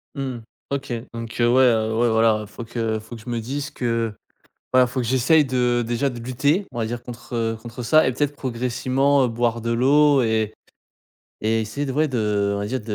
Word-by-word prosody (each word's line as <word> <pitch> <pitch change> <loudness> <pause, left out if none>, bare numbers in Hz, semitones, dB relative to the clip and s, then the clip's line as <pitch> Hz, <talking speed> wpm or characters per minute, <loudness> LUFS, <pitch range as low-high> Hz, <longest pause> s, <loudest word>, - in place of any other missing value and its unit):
Mmh, 135 -3 -4 0.3
OK. 140 -1 -3 0.2
Donc, 115 -1 -7
heu, 120 - +4
ouais, 130 +2 +5
heu, 110 -2 +2
ouais, 120 +1 +3
voilà, 110 -1 +3
il 105 - -8
faut 115 +3 -9
que 115 -1 -2
faut 110 +2 -10
que 115 - -11
je 110 - -9
me 120 -1 -1
dise 140 +5 -4
que, 115 -2 -1 0.6
voilà, 130 0 +6
faut 125 +2 -4
que 125 - -1
j'essaye 130 +6 +4
de 125 -2 +1
déjà, 120 +4 0
de 120 -2 -7
lutter, 140 - 0
on 120 - -5
va 115 - 0
dire, 120 +1 -4
contre, 120 0 -10
heu, 115 -1 0
contre 120 +1 -8
ça. 155 +7 +4
Et - - +2
peut-être, 145 +3 -1
progressivement, 130 +2 +1
heu, - - +2
boire 115 0 -1
de 115 +1 -2
l'eau 140 +4 +4
et 110 -1 0 0.9
et 110 +1 +1
essayer 110 +7 -3
de, 135 - -3
ouais, 155 +3 +1
de, 105 -5 0
on - - -2
va 100 - -2
dire, 130 +4 -2
de 105 -1 -4
120 Hz, 225 wpm, -22 LUFS, 115-130 Hz, 0.9 s, voilà